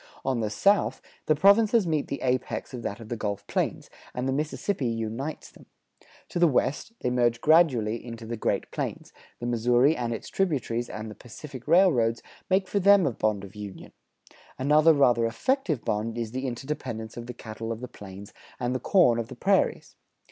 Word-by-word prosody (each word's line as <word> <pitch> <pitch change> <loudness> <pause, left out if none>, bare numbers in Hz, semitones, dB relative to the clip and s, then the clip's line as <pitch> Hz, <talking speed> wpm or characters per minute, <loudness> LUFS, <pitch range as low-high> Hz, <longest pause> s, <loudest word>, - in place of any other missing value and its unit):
On 130 -3 0
the 110 -2 -1
south, 200 - +2 0.3
the 155 - +4
provinces 205 +5 +5
meet 155 -3 0
the 140 - -4
apex 130 +1 -1
of 125 - -5
that 105 0 -4
of 110 -2 -11
the 120 - -2
Gulf 100 -2 -4
Plains, - - -2 0.3
and 125 +1 -2
the 135 - 0
Mississippi 150 +1 -2
unites 115 +6 -4
them. - - -18 0.6
To - - -3
the 175 - +6
west, 145 - 0
they 125 - 0
merge 120 -1 +2
gradually 130 -8 +3
into 115 -1 -8
the 120 +1 -4
Great 110 - -2
Plains; - - -5 0.3
the 120 - -5
Missouri 120 +5 +3
and 120 -4 -2
its 115 - -5
tributaries 130 -10 -1
and 110 0 -6
the - - -7
Pacific 130 +3 -11
railroads 150 -10 +4 0.3
make 190 0 +2
for 200 - 0
them 200 -1 +6
a 140 - +1
bond 110 -3 -1
of 100 0 -10
union; 105 -2 -9 0.7
another 150 +4 +5
rather 120 -5 +4
effective 175 - -1
bond 110 +2 -1
is 115 -2 -3
the 130 +2 -3
interdependence 120 -4 -5
of 120 0 -7
the 125 - -6
cattle 115 0 -6
of 115 - -4
the 125 - -6
plains 100 -2 -11 0.3
and 125 0 -1
the 130 - -1
corn 125 -11 +4
of 115 - -3
the 130 - -9
prairies. 195 +9 +1
125 Hz, 190 wpm, -27 LUFS, 115-155 Hz, 0.7 s, the